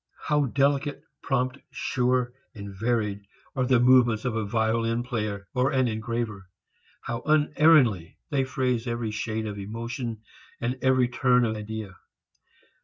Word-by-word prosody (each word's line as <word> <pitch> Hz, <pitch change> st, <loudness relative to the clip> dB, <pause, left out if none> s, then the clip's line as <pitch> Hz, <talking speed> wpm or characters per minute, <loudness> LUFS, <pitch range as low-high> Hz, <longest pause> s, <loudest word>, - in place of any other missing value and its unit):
How 150 Hz, -1 st, +3 dB
delicate, 140 Hz, +2 st, 0 dB, 0.2 s
prompt, 130 Hz, 0 st, -1 dB
sure 125 Hz, -3 st, 0 dB, 0.2 s
and 100 Hz, -2 st, -8 dB
varied 105 Hz, -1 st, -1 dB, 0.3 s
are 130 Hz, -2 st, 0 dB
the 125 Hz, -2 st, +4 dB
movements 120 Hz, -3 st, +4 dB
of 120 Hz, -3 st, -1 dB
a 110 Hz, -2 st, -1 dB
violin 115 Hz, +2 st, 0 dB
player 105 Hz, -5 st, -3 dB
or 130 Hz, +1 st, +2 dB
an 130 Hz, -3 st, +2 dB
engraver! 110 Hz, -3 st, -3 dB, 0.5 s
How 120 Hz, 0 st, -4 dB
unerringly 150 Hz, -, +4 dB
they 140 Hz, -2 st, +2 dB
phrase 125 Hz, -2 st, -1 dB
every 115 Hz, -2 st, -2 dB
shade 110 Hz, +1 st, -3 dB
of 105 Hz, -1 st, -5 dB
emotion 115 Hz, +2 st, -5 dB, 0.4 s
and 125 Hz, +3 st, -2 dB
every 130 Hz, -1 st, +3 dB
turn 125 Hz, 0 st, +3 dB
of 110 Hz, -1 st, -1 dB
idea! 105 Hz, -3 st, -6 dB
120 Hz, 135 wpm, -26 LUFS, 110-130 Hz, 0.5 s, the